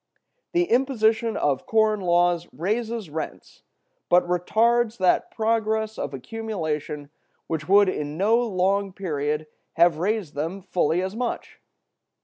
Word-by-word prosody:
The 350 0 +3
imposition 230 -6 +1
of 135 -3 0
corn 220 -1 +3
laws 175 -1 +2
raises 215 - -3
rents, 160 +1 -7 0.5
but 175 0 +4
retards 225 +6 +2
that 185 -1 +2
progress 220 -1 -1
of 140 - -3
accumulation 150 - -4 0.3
which 160 0 -4
would 200 +1 +6
in 150 -4 -3
no 210 +5 +3
long 200 -3 0
period 150 -5 -2 0.3
have 165 -2 +4
raised 200 -3 -1
them 165 +7 -4
fully 175 0 +1
as 190 +2 -4
much. 245 +1 -4
190 Hz, 125 wpm, -24 LUFS, 165-220 Hz, 0.5 s, would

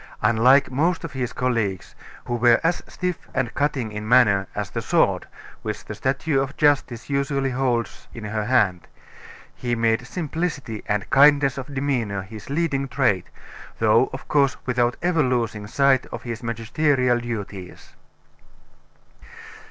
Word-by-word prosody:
Unlike 120 +6 +4
most 165 +7 0
of 165 - -5
his 125 -2 -3
colleagues, 115 -7 -2 0.3
who 120 - -3
were 120 0 +4
as 170 +2 +1
stiff 180 -1 -4
and 125 -3 -1
cutting 140 -6 -1
in 105 +1 -6
manner 105 -6 +4
as 105 -2 -3
the - - -3
sword - - +1 0.3
which - - -5
the - - -6
statue 135 +1 0
of 135 +1 -5
Justice 140 -6 +1
usually 140 -1 0
holds 125 -4 -2
in 115 - -9
her 105 0 -3
hand, 105 -7 +1 0.7
he 120 -1 -2
made 115 +1 +1
simplicity 150 - -4
and 105 -2 -1
kindness 140 -1 +5
of 135 +1 -7
demeanor 120 -8 -1
his 105 +4 -11
leading 140 -2 0
trait, 125 -8 +1 0.5
though, - - +3
of - - -8
course, 140 -2 +2
without 120 -1 +1
ever 175 -2 +2
losing 115 -5 -1
sight 135 +2 +2
of - - -8
his 115 -2 -5
magisterial 120 +2 +1
duties. 100 -6 -7
125 Hz, 145 wpm, -23 LUFS, 110-140 Hz, 0.7 s, kindness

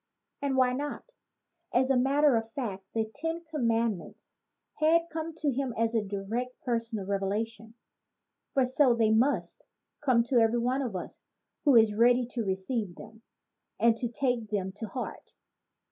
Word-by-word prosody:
And 280 -2 0
why 255 -1 +4
not? 290 - -5 0.6
As 260 +2 +2
a - - +4
matter 275 +2 +4
of 225 0 -1
fact, 210 -6 -5
the 220 -1 +1
Ten 325 +3 -3
Commandments 230 - -2 0.4
had 335 +2 +3
come 320 0 -4
to 300 -3 0
him 260 -2 -2
as 230 0 +1
a 225 - +2
direct 210 +6 -4
personal 230 -4 -2
revelation 210 +3 -3 0.8
for 265 -2 +4
so 260 -1 +3
they 225 -2 +3
must 220 -6 +1 0.4
come 250 -4 +4
to 240 +1 +2
every 225 +1 +3
one 250 +3 0
of 240 -7 -3
us 180 - -6 0.4
who 285 -3 +6
is 220 -2 +6
ready 245 +3 +4
to 240 -2 -2
receive 190 0 -2
them 220 +1 -13 0.6
and 230 -1 +4
to 240 0 -2
take 240 -2 -1
them 195 -3 -2
to 220 - -5
heart. 245 +5 -7
235 Hz, 160 wpm, -29 LUFS, 220-265 Hz, 0.8 s, who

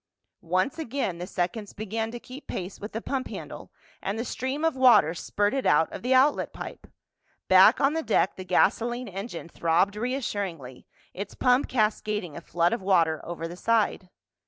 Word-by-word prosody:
Once 185 - +1
again 245 - -3
the 180 - -5
seconds 190 +5 -3
began 220 +2 -3
to 240 +1 -7
keep 260 +4 -11
pace 185 +1 -5
with 210 - -7
the 225 - -5
pump 265 -2 -2
handle - - -8 0.3
and 200 +3 -3
the 230 - -3
stream 265 +6 -2
of 325 - +1
water 250 - +6
spurted 205 +8 -1
out 150 +2 +3
of - - -6
the 250 - -2
outlet 260 +3 +4
pipe. - - -9 0.6
Back - - +7
on 275 +2 +3
the 325 - -1
deck 215 - +1
the 185 - -7
gasoline 235 +7 +1
engine 195 -2 -6
throbbed 170 +4 +1
reassuringly, 205 - -4 0.3
its 200 +2 -6
pump 250 +1 +3
cascading 210 - -1
a 170 - -7
flood 170 +2 +1
of 230 - -2
water 170 -5 +2
over 165 -1 -5
the 170 - -8
side. 210 -2 0
210 Hz, 175 wpm, -26 LUFS, 180-250 Hz, 0.6 s, Back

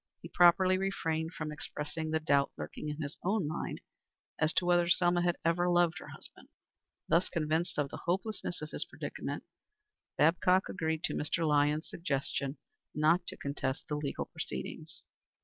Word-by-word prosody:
He - - -7
properly 185 +1 +5
refrained 165 -4 -1
from 155 -1 -4
expressing 150 +1 -4
the 160 0 +1
doubt 140 -3 +2
lurking 150 - -5
in 150 +1 -4
his 145 +1 -5
own 195 -3 +1
mind 155 - -4 0.6
as 160 0 +3
to 180 - +2
whether 175 -1 +3
Selma 175 0 +4
had 175 -1 +1
ever 175 +2 +3
loved 175 +1 +3
her - - -10
husband. - - -12 0.6
Thus 170 +3 +3
convinced 160 0 0
of 145 -2 +1
the - - -8
hopelessness 185 -2 -2
of 155 - -6
his - - -1
predicament, - - -5 0.7
Babcock 180 +4 +4
agreed 160 -3 -2
to - - 0
Mr. 160 +2 0
Lyons's 150 +1 +2
suggestion 140 -3 -2 0.4
not 170 +4 +3
to - - -5
contest 140 -1 -3
the 150 - -2
legal 150 -1 -2
proceedings. - - -7
160 Hz, 160 wpm, -32 LUFS, 150-175 Hz, 0.7 s, properly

